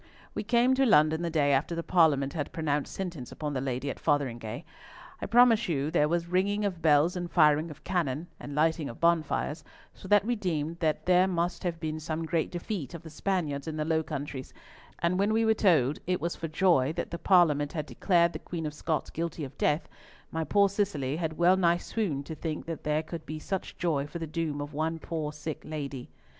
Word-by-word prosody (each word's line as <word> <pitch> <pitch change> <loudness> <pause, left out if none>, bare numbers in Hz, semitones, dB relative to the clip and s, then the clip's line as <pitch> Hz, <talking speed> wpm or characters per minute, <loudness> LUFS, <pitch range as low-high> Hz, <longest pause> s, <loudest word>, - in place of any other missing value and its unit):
"We - - -2
came 240 +4 +3
to 265 +1 +3
London 155 -4 +4
the 170 - -1
day 150 -3 +2
after 145 +5 +1
the 170 - -3
Parliament 150 -7 +3
had 150 -4 -3
pronounced 150 -3 -1
sentence 170 -10 -5
upon 150 -1 -4
the 130 - -1
Lady 130 +1 -3
at 140 - -4
Fotheringhay. 120 -7 -1 0.6
I - - -2
promise 230 -2 +5
you 145 -1 0
there 150 -3 +3
was 170 0 0
ringing 200 +4 +1
of 180 -4 -3
bells 155 +2 +4
and 175 -1 -3
firing 155 -1 +4
of 150 0 -12
cannon, 165 -4 -1
and 145 - -7
lighting 160 -1 +1
of 115 - -10
bonfires, 160 -2 +1 0.3
so - - -12
that 205 0 +4
we 240 +1 +1
deemed 170 -5 -2
that 155 -3 0
there 185 +1 +5
must 175 -1 -1
have 170 -2 -2
been 155 -1 -3
some 160 +1 -3
great 160 0 0
defeat 175 - -5
of 170 - -9
the 160 - -10
Spaniards 155 -4 -2
in 155 -1 -4
the 155 - -1
Low 160 0 +2
Countries; 145 -3 -6 0.4
and 175 +2 0
when 200 +2 +2
we 225 +1 +2
were 220 - +5
told 155 - +3
it 180 0 +1
was 170 +1 -2
for 165 - -4
joy 155 -4 +3
that - - -4
the 170 - -4
Parliament 155 -7 +4
had 155 -4 -3
declared 170 0 +2
the - - -5
Queen 165 -2 -5
of 150 - -3
Scots 155 +1 -2
guilty 165 -1 -3
of 135 -1 -7
death, 150 +2 +1 0.4
my 160 0 -1
poor 200 +4 +4
Cicely 175 -9 -1
had 160 -2 -3
well 180 +2 +5
nigh 170 -2 +3
swooned 175 -8 -2
to 160 - -6
think 155 0 -4
that 165 -1 -6
there 150 +1 +1
could 160 0 -8
be 155 - -4
such 190 +4 -4
joy 150 -5 0
for 170 - -6
the 165 - -4
doom 155 -2 -3
of 145 +1 -6
one 160 +2 -1
poor 160 -2 -4
sick 150 0 -6
lady. 140 -4 -6
160 Hz, 220 wpm, -29 LUFS, 150-175 Hz, 0.6 s, promise